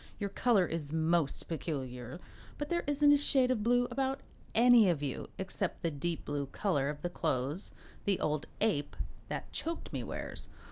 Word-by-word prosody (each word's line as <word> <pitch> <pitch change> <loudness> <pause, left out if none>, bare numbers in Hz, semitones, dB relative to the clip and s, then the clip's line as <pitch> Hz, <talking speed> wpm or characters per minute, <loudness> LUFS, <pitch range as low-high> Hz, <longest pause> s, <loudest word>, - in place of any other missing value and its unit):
Your 200 -2 -3
color 215 -4 +3
is 160 -4 -4
most 160 -2 +1
peculiar, 130 -4 -4 0.4
but 295 0 -4
there 345 0 0
isn't 290 0 +5
a 290 - +7
shade 265 -3 +5
of 235 -4 +1
blue 245 +2 +3
about 270 0 -1 0.3
any 235 -3 +7
of 155 -4 0
you, 135 -3 -3
except 190 0 -3
the 165 - +1
deep 160 +3 -3
blue 145 -1 -2
color 145 -3 0
of 150 0 -6
the 175 - 0
clothes 150 +1 -1 0.3
the 200 -2 +2
old 150 0 -1
ape 145 -10 +1 0.3
that - - -4
choked 330 +1 -4
me - - -2
wears. - - -6
175 Hz, 175 wpm, -32 LUFS, 145-245 Hz, 0.4 s, a